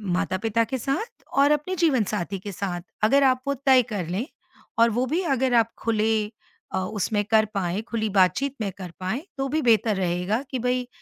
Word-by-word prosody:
माता-पिता 220 +5 0
के 230 +4 -3
साथ 370 - -3
और 280 +1 +5
अपने 300 +5 0
जीवनसाथी 225 - 0
के 200 +2 -7
साथ, 180 -2 -4 0.2
अगर 275 +6 +5
आप 255 -1 +4
वो 280 - +2
तय 260 -1 +7
कर 190 -6 -2
लें 195 +8 -2 0.5
और 230 +1 +6
वो 250 - +2
भी 320 +8 0
अगर 265 -5 +1
आप 230 -1 +4
खुले 220 -1 +1 0.6
अ, - - 0
उसमें 205 +2 -1
कर 220 0 +4
पाएँ, 185 +1 -1
खुली 225 -1 -2
बातचीत 205 +8 +2
में 200 -2 -1
कर 185 -3 -7
पाएँ 190 +9 -2 0.2
तो 270 - -1
भी 310 +3 0
बेहतर 225 -2 +3
रहेगा 180 +5 0
कि 260 - -2
भाई 250 +1 0
225 Hz, 190 wpm, -25 LUFS, 195-265 Hz, 0.6 s, तय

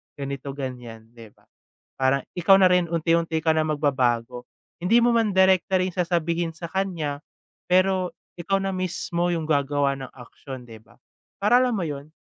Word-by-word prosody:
ganito, 140 0 -6
ganyan, 120 -5 -7
di 115 -2 -13
ba? - - -30 0.6
Parang 135 +1 +2
ikaw 180 +2 +5
na 190 - +6
rin 180 -1 +2
unti-unti 165 0 0
ka 160 - +4
na 160 - +2
magbabago 125 -5 -1 0.3
hindi 225 +7 +4
mo 240 0 +3
man 225 -3 +2
direkta 190 0 +3
rin 185 -1 -2
sasabihin 170 -1 -1
sa 165 +1 -7
kanya 165 -7 -3 0.5
pero 185 0 +2 0.3
ikaw 185 +3 0
na 195 0 -2
mismo 175 -1 -2
yung 165 -2 -1
gagawa 140 -1 +1
ng 130 - -7
aksyon, 130 +1 -10
di 110 - -11
ba, - - -23 0.4
para 210 +5 +5
alam 245 -3 +1
mo 190 - -2
yun, 145 -1 -6
165 Hz, 165 wpm, -24 LUFS, 140-185 Hz, 0.6 s, na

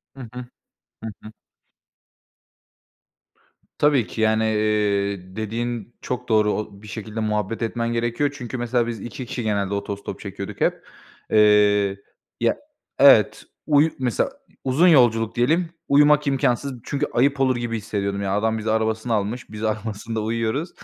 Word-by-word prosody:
Hı 135 - -10
hı. 125 0 -6 0.6
Hı 110 - -4
hı. 110 - -10 2.5
Tabii 145 -6 +3
ki, 110 - -5
yani, 110 0 +3
eee, 100 -3 0
dediğin 115 +1 -4
çok 125 -1 -5
doğru. 105 -1 +3
O 100 -1 -5
bir 105 - -12
şekilde 110 0 -6
muhabbet 105 0 -1
etmen 115 +1 -1
gerekiyor. 120 +5 0
Çünkü 125 -2 -6
mesela 120 0 0
biz 115 -4 -5
2 120 +2 -7
kişi 120 -1 -4
genelde 100 -2 -1
otostop 100 0 -5
çekiyorduk - - -7
hep. - - +1 0.5
Eee 105 -2 +4 0.4
ya - - +1 0.4
evet, - - +6 0.2
uyu 150 +1 +5
mesela 130 - 0 0.3
uzun 140 +8 +3
yolculuk 115 -8 +4
diyelim 160 +8 +2 0.2
uyumak 150 +1 +5
imkansız 135 0 +1
çünkü 145 +1 -1
ayıp 135 +3 +2
olur 130 -1 +3
gibi 120 -1 -2
hissediyordum 100 -2 -3
yani 100 -1 -1
adam 110 +1 0
bizi 110 0 -2
arabasını 110 +1 0
almış, 110 +4 -2
biz 105 0 -7
arabasında 110 0 -3
uyuyoruz. 115 +8 -1
115 Hz, 140 wpm, -23 LUFS, 105-125 Hz, 2.5 s, evet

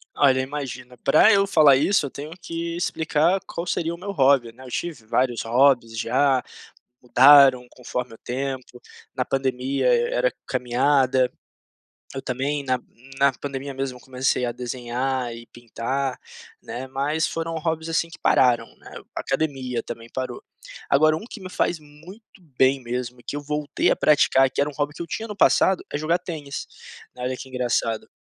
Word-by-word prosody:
Olha, 130 -2 +4
imagina, 130 -3 -6
pra 155 - +5
eu 195 0 +4
falar 155 -7 +6
isso 170 +4 +2
eu - - -4
tenho 145 +4 -8
que 170 0 -4
explicar 165 +1 +1
qual 170 +1 -5
seria 170 -1 -1
o - - -7
meu 200 +3 -5
hobby, 135 -7 +3
né. 125 +3 -15
Eu 130 - -10
tive 150 -4 -5
vários 120 +1 0
hobbies 120 -1 +3
já, 130 +3 +2 0.6
mudaram 130 0 +7
conforme 125 -1 -5
o - - -18
tempo, 130 0 -5 0.3
na 130 - 0
pandemia 135 0 -1 0.2
era 125 +1 +1 0.2
caminhada, 130 0 +2 0.8
eu 135 - -5
também 140 +3 -2
na 130 -1 0 0.4
na 140 0 +5
pandemia 135 +1 -6
mesmo 130 -2 -4
comecei 130 -1 -1
a 120 - -2
desenhar 125 0 -3
e 115 0 -11
pintar, 125 +3 -4 0.4
né, 125 +2 -6
mas 145 +4 0
foram 165 0 -4
hobbies, 160 0 -2
assim, 165 0 0
que - - -12
pararam, 125 -2 +3
né, - - -14 0.3
academia 135 -4 -2
também 115 0 -8
parou. 130 -2 -4 0.5
Agora 155 +3 +5
um 185 - -7
que 220 - -9
me 185 -1 -8
faz 175 - 0
muito 165 +9 -16 0.2
bem 135 0 +3
mesmo 125 0 -4
e - - -21
que - - -5
eu 145 - -5
voltei 150 0 0
a - - +2
praticar, 135 -3 +4
que - - -2
era 145 +1 +1
um - - -14
hobby 145 +1 -2
que 170 - -6
eu - - -7
tinha 225 +7 -4
no 210 - -7
passado, 190 -2 +3
é - - -1
jogar 160 +3 +1
tênis, 155 -6 -6 0.5
né, 125 - -8
olha 130 +1 -2
que 130 - -9
engraçado. 120 -3 -1
135 Hz, 170 wpm, -23 LUFS, 125-150 Hz, 0.8 s, mudaram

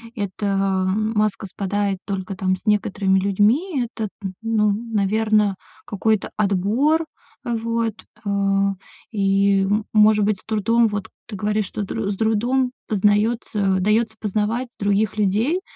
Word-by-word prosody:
эта, 205 -1 -4
ва 190 -1 +1
маска 215 -2 0
спадает 200 +1 -2
только, 195 -1 -4
там, 185 0 0
с 185 - -16
некоторыми 195 -2 +2
людьми- 230 - +2
это, 220 -2 -4
т 195 -2 -4
ну, 220 -2 +2
наверное, 215 -1 +1 0.3
какой-то 215 0 0
отбор, 215 - +2 0.4
э, 240 -2 -1
вот. 230 0 -1 0.3
Э, - - -2 0.8
и, 195 -1 +2
м, 205 +2 0
может 215 -1 +5
быть, 210 -2 0
с - - -20
трудом, 225 +2 +2
вот 205 -2 -4 0.2
ты 220 - -7
говоришь, 210 +1 0
что 205 - -5
др 200 +1 -3
с 195 - -4
трудом 240 +4 +1 0.2
познаётся 210 -1 +1
даётся 220 +3 +1
познавать 215 +4 -1
других 205 +1 +1
людей. 215 - +1
210 Hz, 135 wpm, -22 LUFS, 195-225 Hz, 0.8 s, может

